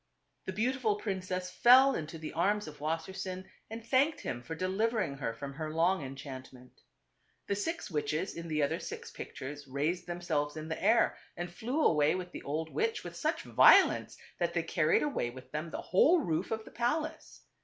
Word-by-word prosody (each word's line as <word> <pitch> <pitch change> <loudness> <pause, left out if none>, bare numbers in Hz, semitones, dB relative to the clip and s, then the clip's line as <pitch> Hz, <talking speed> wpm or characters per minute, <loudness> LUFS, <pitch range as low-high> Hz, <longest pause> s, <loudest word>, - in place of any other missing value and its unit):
The - - -3
beautiful 225 +1 +1
princess 185 -3 -3
fell 260 +6 +7
into 160 -3 -4
the 160 -1 -7
arms 205 +4 +1
of 150 -1 -10
Wassersein 185 +4 -3 0.2
and 225 +1 -7
thanked 275 +6 +2
him 120 - -4
for 160 +6 -6
delivering 190 -2 0
her 135 -4 -2
from 140 +5 -7
her 155 +1 -4
long 165 +1 +2
enchantment. 130 -2 -9 0.6
The 200 - -1
six 270 - -3
witches 155 +4 -1
in 170 0 -6
the 155 -2 0
other 140 - 0
six - - -7
pictures 145 +1 -7
raised 155 +7 -1
themselves 160 -4 -2
in 155 +1 -6
the 160 - -4
air 225 +4 +3 0.2
and 175 0 -4
flew 255 - -1
away 150 +1 +4
with 180 -1 -5
the - - -7
old 155 +3 -3
witch 450 +1 -1
with - - -8
such - - -1
violence - - +5 0.2
that - - 0
they - - +1
carried 435 - +2
away 285 - -1
with 130 +1 -12
them 155 +2 -3
the - - -5
whole 320 - +4
roof 165 - -1
of 220 -1 -3
the - - -12
palace. 300 +7 -2
175 Hz, 185 wpm, -31 LUFS, 150-220 Hz, 0.6 s, fell